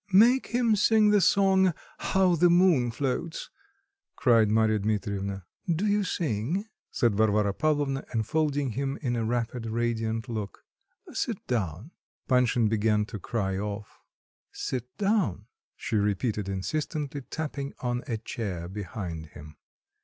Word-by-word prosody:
"Make 240 +7 +6
him 235 -2 +2
sing 210 +1 +4
his 200 -4 +5
song, 190 -3 +4 0.2
'How 190 -2 +2
the 175 +1 +4
Moon 170 -8 +4
Floats,'" 140 +7 -3 0.6
cried 115 -4 +4
Marya 110 0 +3
Dmitrievna. 100 -2 -2 0.3
"Do 170 +5 0
you 205 0 +2
sing?" 160 - -1 0.2
said 120 -3 +1
Varvara 105 -1 +2
Pavlovna, 145 0 0
enfolding 140 +4 0
him 135 +3 -2
in 120 -2 0
a 115 - -1
rapid 115 0 -2
radiant 115 0 -1
look. 110 -4 -5 0.5
"Sit - - -3
down." 105 - -2 0.4
Panshin 125 -3 +3
began 105 -1 +2
to 105 -1 -7
cry 95 -3 -2
off. 105 +1 -6 0.5
"Sit 125 -2 -4
down," 195 - +1 0.3
she 110 - -2
repeated 105 0 0
insistently, 145 - -3
tapping 140 0 -5
on 125 0 -1
a 115 - -1
chair 100 -6 -5
behind 90 -4 -6
him. 75 0 -12
120 Hz, 130 wpm, -28 LUFS, 105-155 Hz, 0.6 s, Make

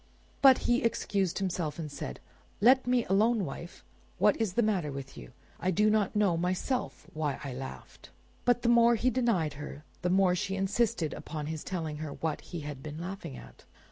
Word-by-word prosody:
But 270 -2 +8
he 240 +1 +3
excused 200 -5 0
himself, 175 -6 -2
and 155 -3 -5
said— 65 - -6 0.4
"Let 255 +4 +5
me 250 -2 +2
alone, 210 +2 +3
wife! 170 +4 -8 0.3
What - - +4
is 210 -5 0
the 235 - +2
matter 190 -9 0
with 135 0 -7
you? - - -10 0.3
I 180 - 0
do 210 +4 +3
not 215 -1 +1
know 205 -5 +3
myself 185 +9 -2
why 150 -3 -2
I 140 -3 -5
laughed." 130 +1 -9 0.3
But 245 -1 +2
the - - +1
more 235 0 +6
he 255 +3 +1
denied 225 - +1
her 150 0 -8 0.2
the 180 - 0
more 185 0 +4
she 190 +2 -2
insisted 195 -3 0
upon 155 -2 -6
his 155 0 -4
telling 160 -5 -4
her 155 -2 -5
what 160 -2 -3
he 170 -3 -7
had 145 -2 -6
been 150 +1 -7
laughing 175 -6 -6
at. - - -14
185 Hz, 190 wpm, -30 LUFS, 155-220 Hz, 0.4 s, But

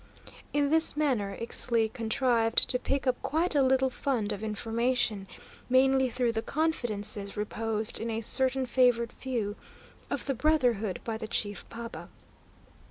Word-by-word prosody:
In 290 0 +1
this 320 -1 +2
manner 245 -10 0
Ixtli 230 -1 +1
contrived 230 0 +2
to 250 - +3
pick 275 +2 -2
up 255 -1 0
quite 335 +4 0
a 285 - +3
little 265 0 +2
fund 240 -6 -1
of 200 - -7
information, 225 -1 -1 0.4
mainly 265 0 +4
through 245 -1 0
the 225 -1 -2
confidences 215 -10 -1
reposed 215 +1 -1
in 230 - -4
a 225 0 -2
certain 260 +3 +3
favoured 245 -2 +2
few 230 -6 -3 0.5
of - - -3
the 275 - 0
brotherhood 245 - +1
by 225 -1 -3
the 220 - -6
chief 205 -2 -3
paba. 230 0 -8
235 Hz, 145 wpm, -29 LUFS, 220-265 Hz, 0.5 s, mainly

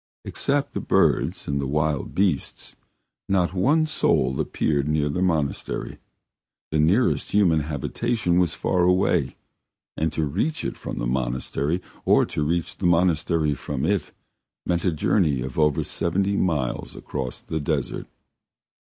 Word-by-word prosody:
Except 140 0 -1
the - - -2
birds - - +1
and 70 0 0
the 70 - -2
wild 75 0 -1
beasts, 90 -8 -1 0.5
not 95 -2 +2
one 145 - +3
soul 70 - +1
appeared 70 -2 0
near 75 -1 +1
the 80 +5 -2
monastery. 80 -6 -1 0.7
The 75 - +1
nearest 95 +11 +2
human 90 -6 +4
habitation 85 - -1
was 90 -3 +1
far 90 - 0
away, 90 +1 +2 0.6
and 80 0 0
to 80 - 0
reach 100 - -1
it - - -3
from - - -6
the - - -2
monastery, 65 +6 -1 0.2
or - - +4
to - - -4
reach 85 +3 -1
the 90 - 0
monastery 85 -3 +2
from 70 +1 -3
it, 100 +2 0 0.5
meant 85 0 0
a 90 - +3
journey 75 - +1
of 65 +3 -5
over 75 -2 +3
seventy 95 +4 0
miles 75 -11 -1
across 65 -2 -5
the 80 - -4
desert. 75 -3 -2
80 Hz, 140 wpm, -24 LUFS, 75-95 Hz, 0.7 s, human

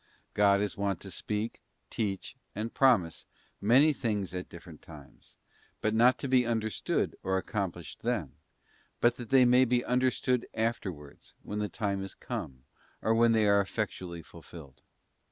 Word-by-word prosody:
God 100 -1 +4
is 105 - -2
wont 100 -3 -1
to 95 - -9
speak, 105 +6 -3 0.3
teach, 100 +1 -3 0.2
and 110 +3 -4
promise, 110 -12 +2 0.3
many 135 +9 +5
things 105 -9 -2
at 90 0 -5
different 85 -2 -12
times, 75 -4 -15 0.5
not 115 +4 +4
to 140 - -4
be 130 -1 +4
understood, 110 -2 -1
or 95 0 0
accomplished 95 -4 -4
then; - - -2 0.7
but 120 - +3
that 120 -2 -8
they 130 -2 +6
may 125 +1 +6
be 125 -1 +1
understood 125 0 +1
afterwards, 95 -10 -4
when 105 - -4
the 105 -1 -1
time 100 -3 -2
is 95 - -8
come, 65 -1 -6 0.4
or 110 - +3
when 115 0 +4
they 110 -1 +3
are 100 0 +5
effectually 95 -4 -4
fulfilled. 80 -6 -13
105 Hz, 150 wpm, -30 LUFS, 95-120 Hz, 0.7 s, they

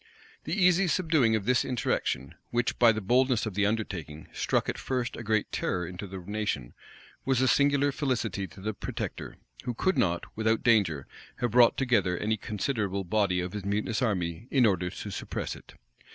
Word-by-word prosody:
The 155 - -3
easy 180 0 +4
subduing 160 -10 +3
of 105 -3 -2
this 125 +1 +3
insurrection, 105 - -1 0.2
which, 120 0 -1
by 120 -2 +7
the 110 -1 -3
boldness 125 +3 +2
of 110 - -4
the 100 +1 +2
undertaking, 85 -8 -4
struck - - 0
at - - -3
first 130 -1 -2
a - - -7
great 110 -1 0
terror 90 -1 -1
into 90 +4 -7
the 95 0 -7
nation, 95 - -3 0.5
was 135 -2 +1
a 130 - +3
singular 145 +1 +3
felicity 115 -9 -1
to 95 +3 -14
the 110 +2 -2
protector; - - -5 0.3
who 120 - -2
could 190 +10 +1
not, 85 -1 +1
without 110 0 +1
danger, 95 - +3 0.3
have 120 -2 -1
brought 120 0 +5
together 105 -9 +2
any 110 +3 0
considerable 105 -2 -2
body 95 -1 +1
of 90 +2 -5
his 105 -2 -4
mutinous 105 +4 -1
army 95 -3 -1
in 130 -4 +4
order 90 -4 +1
to 100 +2 -7
suppress - - -4
it. - - -15
110 Hz, 180 wpm, -28 LUFS, 95-125 Hz, 0.5 s, by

